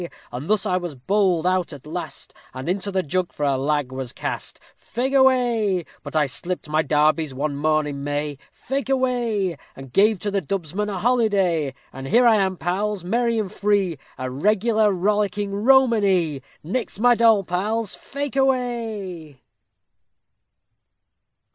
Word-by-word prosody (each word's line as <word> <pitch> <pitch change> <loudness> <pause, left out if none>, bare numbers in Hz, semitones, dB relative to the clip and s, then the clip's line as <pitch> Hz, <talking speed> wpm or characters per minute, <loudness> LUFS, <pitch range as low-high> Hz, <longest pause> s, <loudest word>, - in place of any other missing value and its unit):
_ 170 - -5 0.2
And 130 +8 -6
thus 215 0 +2
was 180 -4 -1
I 125 - -20
bowled 190 -5 +2
out 185 -1 +1
at 140 -1 -11
last, 170 +3 -6 0.2
And 130 +3 -6
into 195 +3 -1
the 190 -1 0
jug 180 +4 -1
for 150 - -5
a 140 -1 +2
lag 140 0 0
was 130 -2 -5
cast; - - -5 0.2
Fake 260 +3 -3
away. 240 - +3 0.2
But - - -9
I 155 -1 +4
slipped 175 +6 -4
my 155 +1 +2
darbies 150 -1 +1
one 145 +1 -2
morn 155 +1 +1
in 140 -1 -5
May, 145 0 -3
Fake 270 0 -4
away, 240 - 0 0.2
And 135 -2 -11
gave 210 +1 +4
to 205 - -2
the 195 -1 0
dubsman 190 +4 -3
a 200 - -3
holiday. 195 - +1 0.2
And 135 0 -7
here 245 - +4
I 225 -2 +6
am, 190 -2 0
pals, 190 +3 -2
merry 235 +5 +1
and 205 -4 -2
free, 200 -7 0 0.2
A 130 0 -4
regular 215 - +2
rollicking 200 +1 0
romany. 205 - +3 0.2
_Nix 210 +3 -3
my 245 +2 +5
doll 225 -3 +4
pals, 205 +4 -1
fake 280 0 -5
away. 225 - -1
190 Hz, 155 wpm, -23 LUFS, 155-220 Hz, 0.2 s, I